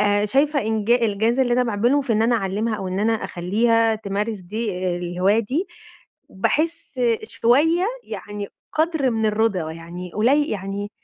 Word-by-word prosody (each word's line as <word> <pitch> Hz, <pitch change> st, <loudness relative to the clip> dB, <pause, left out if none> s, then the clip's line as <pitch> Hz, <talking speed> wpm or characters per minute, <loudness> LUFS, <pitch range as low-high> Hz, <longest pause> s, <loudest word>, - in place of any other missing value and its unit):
آآ 205 Hz, 0 st, +2 dB
شايفة 285 Hz, +5 st, +2 dB
إنجا 220 Hz, +1 st, +1 dB
الجاز 220 Hz, +4 st, 0 dB
اللي 250 Hz, -2 st, +2 dB
أنا 250 Hz, -, +3 dB
باعمله 235 Hz, +6 st, +2 dB
في 265 Hz, -4 st, -1 dB
إن 220 Hz, -, +2 dB
أنا 235 Hz, +1 st, +3 dB
أعلِمها 215 Hz, +2 st, -1 dB
أو 190 Hz, -, -4 dB
إن 185 Hz, +1 st, -3 dB
أنا 225 Hz, +2 st, +2 dB
أخلّيها 225 Hz, +4 st, +1 dB
تمارس 210 Hz, +1 st, -3 dB
دي 210 Hz, +5 st, -4 dB, 0.3 s
الهواية 180 Hz, +4 st, +1 dB
دي، 265 Hz, -, -1 dB, 0.6 s
باحس 310 Hz, -, -1 dB, 0.2 s
شوية 320 Hz, +10 st, +2 dB, 0.2 s
يعني 205 Hz, -1 st, -6 dB, 0.2 s
قدر 315 Hz, -4 st, +1 dB
من 220 Hz, -1 st, 0 dB
الرضا، 210 Hz, -7 st, 0 dB
يعني 170 Hz, +2 st, -8 dB
قلي 275 Hz, +8 st, +3 dB
يعني 200 Hz, 0 st, -4 dB
220 Hz, 150 wpm, -22 LUFS, 200-250 Hz, 0.6 s, أنا